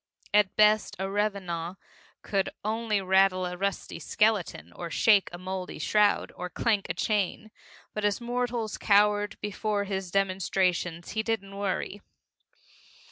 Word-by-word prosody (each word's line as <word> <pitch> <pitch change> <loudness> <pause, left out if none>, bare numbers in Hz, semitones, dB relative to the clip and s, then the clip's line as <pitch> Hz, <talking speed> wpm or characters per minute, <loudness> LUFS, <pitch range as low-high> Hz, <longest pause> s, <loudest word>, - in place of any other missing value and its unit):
At 205 -2 +4
best 215 0 +4
a 190 +1 -2
revenant 195 -4 -2 0.5
could 195 -2 0 0.2
only 215 -1 0
rattle 190 -1 +3
a 180 0 -4
rusty 200 +2 -3
skeleton, 190 - 0
or 170 - -6
shake 205 +2 +4
a 175 - -7
moldy 185 0 -5
shroud, 210 -1 +2
or 180 0 -5
clank 210 +1 0
a - - -1
chain 210 0 -1 0.4
but 210 - -3
as 205 -1 +1
mortals 240 -2 -2
cowered 205 0 +3
before 210 0 -1
his 190 -2 -4
demonstrations, 185 -3 0
he 220 - 0
didn't 205 -3 -3
worry. 200 0 -3
200 Hz, 135 wpm, -28 LUFS, 185-210 Hz, 0.5 s, At